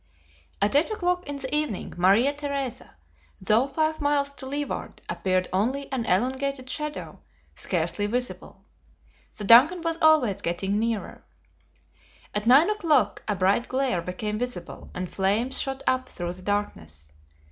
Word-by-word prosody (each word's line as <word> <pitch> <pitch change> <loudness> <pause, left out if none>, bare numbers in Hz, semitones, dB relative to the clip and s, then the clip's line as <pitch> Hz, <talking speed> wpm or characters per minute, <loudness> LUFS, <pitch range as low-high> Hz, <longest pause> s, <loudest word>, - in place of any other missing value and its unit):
At 210 +6 +2
eight 295 +3 +4
o'clock 360 -5 -1
in 285 - -2
the 275 0 -3
evening, 300 -10 -2
Maria 200 +10 +4
Theresa, 280 -4 -5 0.4
though 220 +7 +2
five 310 +2 -1
miles 285 -1 +2
to 265 -1 -8
leeward, 285 +1 -4
appeared 185 -1 0
only 260 +10 -1
an 245 -4 -2
elongated 260 +6 0
shadow, 300 -1 -5 0.3
scarcely 205 0 -1
visible. 245 +3 -4 0.7
The 210 - -5
DUNCAN 260 - +7
was 330 0 -2
always 305 -11 +4
getting 190 +4 -1
nearer. 225 -1 -3 1.1
At 210 +2 -2
nine 285 - +6
o'clock, 310 - +1
a 210 - 0
bright 195 +6 +2
glare 260 -8 0
became 210 +5 -4
visible, 245 -8 -5
and 180 0 -3
flames 205 +8 +1
shot 270 0 -3
up 255 0 0
through 175 0 -5
the 185 - -11
darkness. 80 - -4
250 Hz, 140 wpm, -25 LUFS, 200-285 Hz, 1.1 s, DUNCAN